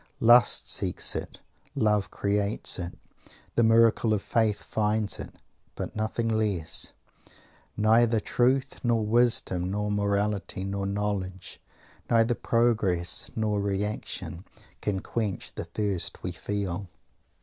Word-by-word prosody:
Lust 120 -1 +5
seeks - - +1
it; - - -6 0.3
Love 105 -3 +1
creates 100 0 0
it; 85 0 -6 0.6
the - - +2
miracle 115 -1 +4
of 100 - -4
Faith 110 -3 +1
finds 105 -1 0
it - - -8 0.4
but - - -5
nothing 110 +2 -1
less, 100 -8 -1 0.9
neither 110 +2 +4
truth 125 +4 +1
nor 115 -3 +1
wisdom 110 -6 +2
nor 105 +1 -2
morality 100 -1 -1
nor 100 0 -3
knowledge, 100 -2 -3 0.5
neither 115 +1 +4
progress 110 -8 +1
nor 105 -2 0
reaction, 100 -3 -3 0.4
can 95 -2 -1
quench 110 -4 -3
the - - -5
thirst 100 -5 -3
we 90 - -2
feel. 95 0 -4
105 Hz, 115 wpm, -27 LUFS, 100-115 Hz, 0.9 s, Lust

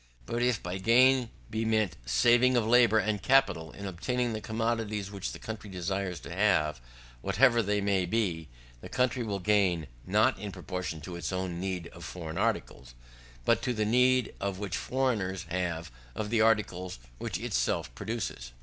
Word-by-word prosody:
But 120 - -2
if 120 -3 +1
by 90 +2 -4
gain 125 +4 +5 0.2
be 110 +1 -1
meant 110 -6 +1
saving 120 - +4
of 115 - +2
labour 120 -1 +5
and 110 -2 0
capital 95 -12 +3
in 100 - -8
obtaining 120 +6 -1
the 110 - -4
commodities 110 -2 -2
which 100 -1 -4
the - - -7
country 110 -2 -7
desires 95 0 -3
to - - -8
have, 80 -9 +2 0.4
whatever 115 +5 +4
they 105 -1 0
may 100 -2 +1
be; 90 - -1 0.3
the - - -10
country 125 0 +1
will 105 -4 -2
gain, 95 -4 +2 0.2
not 110 +7 +3
in 105 -1 -5
proportion 90 -4 -5
to 85 +4 -7
its 80 -4 -3
own 90 -2 -3
need 95 -2 -3
of 85 - -12
foreign 80 -2 -6
articles, - - -2 0.5
but - - +3
to 125 - -1
the 105 -1 0
need 125 +1 +3 0.2
which 100 -3 -3
foreigners 110 -9 -1
have 85 -3 -2 0.2
of 105 0 -3
the 115 -2 +3
articles 100 - +1 0.2
which - - -3
itself - - -1
produces. 95 - -5
100 Hz, 165 wpm, -29 LUFS, 90-115 Hz, 0.5 s, gain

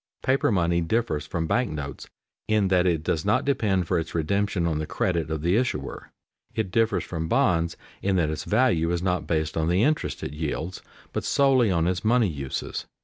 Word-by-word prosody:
Paper 130 -2 +2
money 85 -3 +2
differs 85 -2 -1
from 80 -1 -2
bank 120 +6 +1
notes 70 -2 -6 0.4
in 105 -3 +2
that 90 -1 +3
it 80 -3 +1
does 80 0 0
not 105 +2 +2
depend 100 -10 +1
for 90 -1 +1
its 80 +1 -6
redemption 95 +2 0
on 80 -2 0
the 80 - -3
credit 85 -4 -1
of 80 -1 -3
the 85 +3 +2
issuer. 125 +3 -2 0.4
It 110 -5 -1
differs 115 +2 +2
from 80 -2 -4
bonds 85 0 +2 0.2
in 100 -1 +1
that 80 -4 +2
its 80 - -5
value 105 -8 +2
is 85 0 -1
not 90 -1 0
based 80 -1 -1
on 80 -1 0
the 90 +5 +3
interest 150 +2 0
it - - -4
yields, 80 +3 -4 0.3
but - - -2
solely 135 -5 +3
on 85 -3 +2
its 90 0 -1
money 115 0 +3
uses. 70 -4 -4
90 Hz, 200 wpm, -25 LUFS, 80-110 Hz, 0.4 s, that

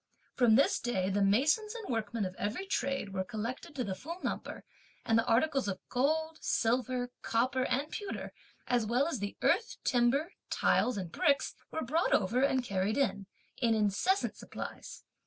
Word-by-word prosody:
From 240 -4 +5
this 275 - +4
day 195 -6 -1
the 200 +1 +1
masons 290 - +3
and 455 -3 -6
workmen 220 -1 -1
of 185 - -4
every 215 - -2
trade 275 - -2
were 190 -1 -1
collected 240 - -5
to 255 - -1
the 195 - -3
full 330 - -7
number; - - -4 0.4
and 225 - +2
the 230 - +3
articles 270 +1 +2
of 195 -2 -2
gold, 315 +5 0
silver, 245 +1 0
copper, 255 +3 +1
and 275 +3 0
pewter, 410 -2 -5 0.3
as 245 -2 +2
well 250 +6 +2
as 325 -8 -2
the 205 0 -4
earth, 450 +7 +2
timber, 265 +8 +2 0.2
tiles, 250 -4 +2
and 180 -4 -4
bricks, 280 - +2 0.2
were 320 - -3
brought 315 +8 +1
over, 225 +6 +2
and 265 -2 +2
carried 200 0 -1
in, 210 -8 0 0.3
in 230 -3 +2
incessant 215 - +1
supplies. - - -8
245 Hz, 170 wpm, -32 LUFS, 210-285 Hz, 0.4 s, From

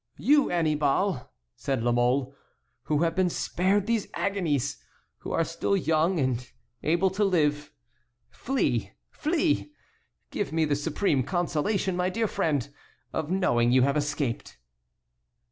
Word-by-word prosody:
"You 290 0 +4
Annibal," 155 -2 +1 0.3
said 135 -4 -2
La 120 - +2
Mole, 125 +3 +1 0.5
"who 150 +1 +1
have 165 - +1
been 185 -1 +2
spared 190 +4 0
these 225 -2 0
agonies, 150 -9 -1 0.4
who - - -7
are 165 - +2
still 165 +4 -1
young 165 +1 +1
and 125 -2 -1 0.3
able 175 +4 +2
to 200 +3 0
live, 150 -6 +1 0.6
flee, 265 - -1 0.2
flee; 310 -1 0 0.6
give 205 - -2
me 160 0 +2
the 150 -1 +1
supreme 145 0 0
consolation, 175 - -1
my 180 +1 0
dear 225 +4 0
friend, 145 - 0 0.5
of 160 -1 -2
knowing 120 -11 +2
you 130 0 +5
have 140 +2 +2
escaped." 145 -4 -2
160 Hz, 130 wpm, -27 LUFS, 140-190 Hz, 0.6 s, you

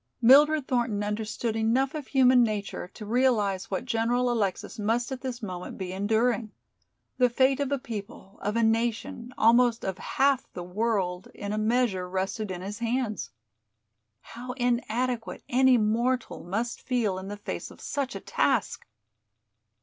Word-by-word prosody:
Mildred 285 +4 +6
Thornton 235 -5 0
understood 215 +2 -2
enough 235 +5 +1
of 300 -4 -5
human 255 -2 +5
nature 210 -5 -2
to 215 - -8
realize 215 -5 +1
what 190 - -2
General 245 +1 +1
Alexis 210 -3 -2
must 230 +4 0
at 260 -1 -4
this 255 -3 -5
moment 180 -3 -6
be 185 -1 -4
enduring. 220 +3 +1 0.7
The 250 -1 +5
fate 260 +3 +3
of 280 -1 -1
a 280 - +2
people, 210 -6 -8
of 205 +2 -2
a 230 - +2
nation, 230 +1 0
almost 235 +1 +4
of 190 -1 -3
half 270 -1 +1
the 180 - -6
world, 190 -1 -1
in 205 0 -4
a - - -1
measure 215 -5 +1
rested 190 +3 -2
in 180 -1 -5
his 205 +3 -6
hands. 235 -2 -2 0.9
How 250 +2 -8
inadequate 245 -1 -1
any 260 0 +5
mortal 235 +3 0
must 225 +7 -3
feel 225 -7 0
in 190 - -8
the 205 +1 -6
face 205 - -5
of - - -15
such 275 -2 -3
a - - -4
task! - - 0
230 Hz, 155 wpm, -27 LUFS, 205-250 Hz, 0.9 s, Mildred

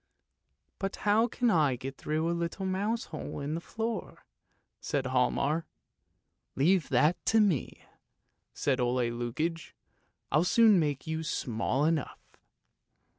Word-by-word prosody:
" - - -49
But 195 0 -2
how 215 +3 +4
can 245 -1 +1
I 150 -7 +3
get 135 +2 -7
through 155 +3 -2
a 170 - +1
little 170 +3 -3
mouse 205 +5 -1
hole 155 - -5
in 145 +1 -3
the 165 - -3
floor? 225 +4 -5 0.3
" - - -46
said 140 -3 -1
Hialmar. 135 +5 +1 0.4
" - - -50
Leave 170 +5 +2
that 150 +7 +2
to 225 - +4
me," 195 - 0 0.7
said 135 -2 0
Ole 120 -1 +1
Lukoie; 155 +8 -3 0.3
" - - -45
I'll 155 +4 +4
soon 215 +1 +5
make 145 -4 -1
you 160 0 -2
small 130 -2 -1
enough! 160 -3 0
160 Hz, 145 wpm, -30 LUFS, 135-190 Hz, 0.7 s, soon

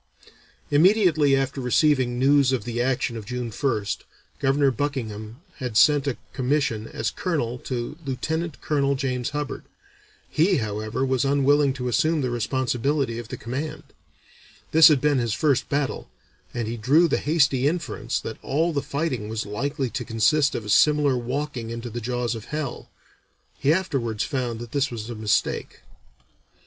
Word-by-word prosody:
Immediately 160 -3 +4
after 135 0 -1
receiving 125 -1 +2
news 135 +1 +4
of 130 -5 0
the 120 +1 -2
action 125 -1 0
of 110 -3 -7
June 125 -1 -4
1st, 110 -4 -1 0.4
Governor 135 +1 +3
Buckingham 120 -3 -4 0.2
had 125 -6 -3
sent 145 +1 +5
a 135 - -1 0.2
commission 130 -4 0
as 110 -1 -3
colonel 125 -9 -2
to 125 +5 -5
Lieutenant 160 +4 -3
Colonel 140 -2 +1
James 130 -2 -2
Hubbard. 150 -1 -4 0.7
He, 175 +3 +2
however, 110 +4 -2
was 130 0 +1
unwilling 140 +1 +3
to 125 -2 -4
assume 155 +5 +2
the 125 -2 -1
responsibility 125 +1 -1
of 120 - -8
the - - -6
command; 145 +7 -5 0.9
this 160 -1 +9
had 150 -5 +4
been 145 -2 +3
his 115 -2 -1
first 145 -4 +1
battle, 145 -1 -2 0.4
and 120 -3 -3
he 115 +1 -3
"drew 145 +10 +4
the - - +1
hasty 140 -4 +2
inference 170 +1 -2
that - - -7
all 160 +5 0
the 140 - 0
fighting 135 -9 -3
was 110 0 -3
likely 135 +5 -2
to 130 -1 -3
consist 120 +6 +2
of 110 - -4
a - - -7
similar 145 +4 +4
walking 125 -1 -3
into 115 +1 -6
the 120 +2 -5
jaws 120 0 -1
of 115 -1 -7
hell. 150 -2 -5 0.7
He 140 - +3
afterwards 135 - 0
found 125 -6 -2
that 120 -1 -8
this 140 -1 +1
was 115 -1 -6
a - - -3
mistake." 110 -2 -1
130 Hz, 160 wpm, -24 LUFS, 120-145 Hz, 0.9 s, this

